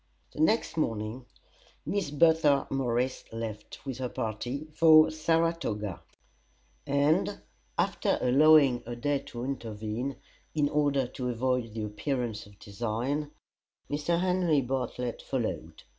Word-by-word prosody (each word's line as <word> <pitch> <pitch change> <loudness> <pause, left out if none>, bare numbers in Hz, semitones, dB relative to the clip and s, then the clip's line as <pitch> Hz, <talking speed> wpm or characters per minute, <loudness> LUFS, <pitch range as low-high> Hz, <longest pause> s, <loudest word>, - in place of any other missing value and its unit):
The - - -10
next 170 +1 +2
morning 115 -2 -2 0.6
Miss 195 -6 -1
Bertha 150 -2 +4
Morris 130 -1 0
left, 110 0 -7
with 130 -2 -5
her 125 -1 -2
party, 120 +8 -4
for 155 -1 +7
Saratoga; 155 - 0 0.9
and 145 +3 +2 0.4
after - - +1
allowing 140 -1 +5
a 120 - -4
day 140 +4 0
to 120 -3 -8
intervene, 115 0 -4 0.4
in 145 -2 +2
order 145 -3 +2
to 125 +1 -4
avoid 125 -2 -1
the 110 - -3
appearance 110 0 -3
of 100 -1 -18
design, 120 +9 -3 0.6
Mr. 150 +4 0
Henry 180 -5 +2
Bartlett 125 -1 -3
followed. 85 - -4
130 Hz, 115 wpm, -29 LUFS, 115-150 Hz, 0.9 s, for